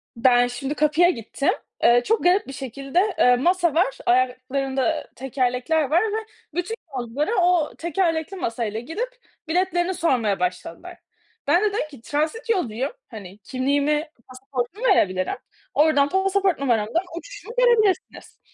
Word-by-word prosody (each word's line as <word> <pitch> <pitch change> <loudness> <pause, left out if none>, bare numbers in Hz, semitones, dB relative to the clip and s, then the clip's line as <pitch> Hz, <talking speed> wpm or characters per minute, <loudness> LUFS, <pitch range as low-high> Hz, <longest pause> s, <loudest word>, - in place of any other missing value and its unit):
Ben 245 0 +4
şimdi 270 +4 -4
kapıya 305 +4 +4
gittim, 275 - -2 0.3
eee, 240 +1 +6
çok 445 +1 +1
garip 360 +3 +3
bir 270 - -7
şekilde, 275 - -1
eee, 250 0 +6
masa 345 +3 +2
var, 325 -4 +1
ayaklarında 260 +4 0
tekerlekler 255 +4 0
var 335 +3 +4
ve 440 0 -1 0.4
bütün 360 +6 -2 0.2
yolculara 250 - -2
o 350 -3 +2
tekerlekli 340 +1 -1
masayla 225 - -3
gidip 330 - -4 0.4
biletlerini 355 +1 +1
sormaya 250 - +1
başladılar. 180 - -4 0.5
Bende 400 +5 +3
dedim 305 - -1
ki 275 -6 -14
transit 310 - -2
yolcuyum, 265 - 0 0.2
hani, 200 -3 -10
kimliğimi 285 - 0 0.2
pasaportumu 260 - -4
verebilirim, 185 -1 +2 0.4
oradan 290 -2 +4
pasaport 385 -2 +1
numaramdan 240 - +1
uçuşumu - - -9
görebilirsiniz. 465 -4 +1
295 Hz, 125 wpm, -23 LUFS, 250-360 Hz, 0.5 s, eee